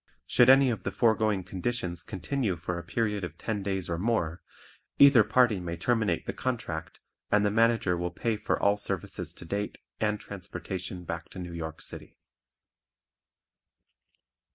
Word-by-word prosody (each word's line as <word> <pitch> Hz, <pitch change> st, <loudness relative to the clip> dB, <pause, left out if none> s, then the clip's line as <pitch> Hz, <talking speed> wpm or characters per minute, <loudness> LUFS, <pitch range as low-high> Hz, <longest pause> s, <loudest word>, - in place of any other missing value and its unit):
Should 125 Hz, 0 st, +5 dB
any 135 Hz, -1 st, +7 dB
of 110 Hz, -5 st, -3 dB
the -, -, -3 dB
foregoing 110 Hz, -4 st, +2 dB
conditions 90 Hz, -2 st, -3 dB
continue 100 Hz, -, -2 dB
for 85 Hz, +1 st, -4 dB
a -, -, -8 dB
period 105 Hz, +2 st, -1 dB
of 85 Hz, -2 st, -6 dB
ten 105 Hz, -3 st, -3 dB
days 95 Hz, -2 st, -2 dB
or 85 Hz, -1 st, -2 dB
more, 90 Hz, -6 st, 0 dB, 0.6 s
either 140 Hz, -5 st, +8 dB
party 120 Hz, -3 st, +3 dB
may 85 Hz, -1 st, -4 dB
terminate 105 Hz, -2 st, +1 dB
the -, -, -3 dB
contract 110 Hz, -11 st, -4 dB, 0.3 s
and 105 Hz, 0 st, +3 dB
the 105 Hz, -, +2 dB
Manager 115 Hz, -4 st, +3 dB
will 90 Hz, 0 st, -2 dB
pay 110 Hz, +5 st, -1 dB
for 105 Hz, -, -1 dB
all 100 Hz, 0 st, +3 dB
services 105 Hz, -, -3 dB
to -, -, -8 dB
date 100 Hz, +4 st, -3 dB, 0.2 s
and 105 Hz, -1 st, 0 dB
transportation 90 Hz, -1 st, -6 dB
back 85 Hz, -1 st, -5 dB
to -, -, -12 dB
New 90 Hz, -2 st, -6 dB
York 80 Hz, -1 st, -5 dB
City. -, -, -7 dB
100 Hz, 155 wpm, -29 LUFS, 85-115 Hz, 0.6 s, either